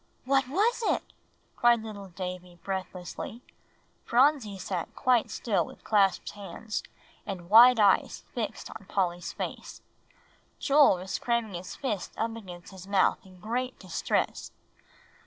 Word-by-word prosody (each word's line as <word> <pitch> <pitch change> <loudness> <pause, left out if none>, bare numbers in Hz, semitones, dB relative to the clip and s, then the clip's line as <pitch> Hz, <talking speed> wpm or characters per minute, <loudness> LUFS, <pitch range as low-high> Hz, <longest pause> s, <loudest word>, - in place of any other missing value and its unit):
"What 270 0 +3
was 420 - +1
it?" 450 - +1 0.5
cried 235 -2 +4
little 205 -3 -8
Davie 180 -1 -7
breathlessly. 190 +4 -5 0.6
Phronsie 245 -5 +3
sat 185 -2 -4
quite 250 -3 +2
still 200 -7 0
with - - -12
clasped 200 -4 +2
hands, 210 +2 -5 0.4
and 185 -2 -7
wide 240 +2 +9
eyes 200 -2 +3
fixed - - -4
on - - -10
Polly's 175 -3 -1
face. - - -6 0.7
Joel 280 -7 +5
was 185 +1 -4
cramming 235 -4 0
his 175 +1 -6
fists 220 -9 -3
up 225 0 -1
against 180 -6 -10
his 190 -1 -11
mouth 200 -1 +2
in 185 -1 -16
great 250 +5 -3
distress. 185 -3 -2
205 Hz, 130 wpm, -28 LUFS, 185-240 Hz, 0.7 s, wide